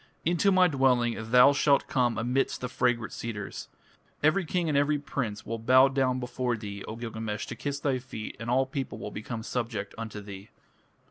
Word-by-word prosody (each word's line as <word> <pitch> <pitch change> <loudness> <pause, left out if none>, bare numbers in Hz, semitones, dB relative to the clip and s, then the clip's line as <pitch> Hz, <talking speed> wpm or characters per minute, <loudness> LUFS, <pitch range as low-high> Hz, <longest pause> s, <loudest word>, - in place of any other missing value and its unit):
Into 175 +4 +3
my 185 -1 +5
dwelling 125 -5 +2
thou 125 +3 +7
shalt 140 0 +3
come 120 -4 +1
amidst 125 +4 0
the 125 - -2
fragrant 120 -2 0
cedars. 105 -4 -6 0.5
Every 160 +5 +3
king 175 +1 0
and 150 - 0
every 145 +1 +3
prince 120 -7 -4
will 115 0 -4
bow 130 +4 +6
down 130 -2 +1
before 125 -1 -2
thee, 100 -2 -7
O 110 - -6
Gilgamesh, 110 -2 -4
to - - -6
kiss 140 +4 -3
thy 135 -2 0
feet, 120 -4 -7
and 120 0 -5
all 130 +2 +3
people 135 -1 -4
will 105 - -6
become 110 +2 -5
subject 115 -5 -3
unto 110 -2 -5
thee." 100 0 -10
125 Hz, 185 wpm, -28 LUFS, 110-140 Hz, 0.5 s, thou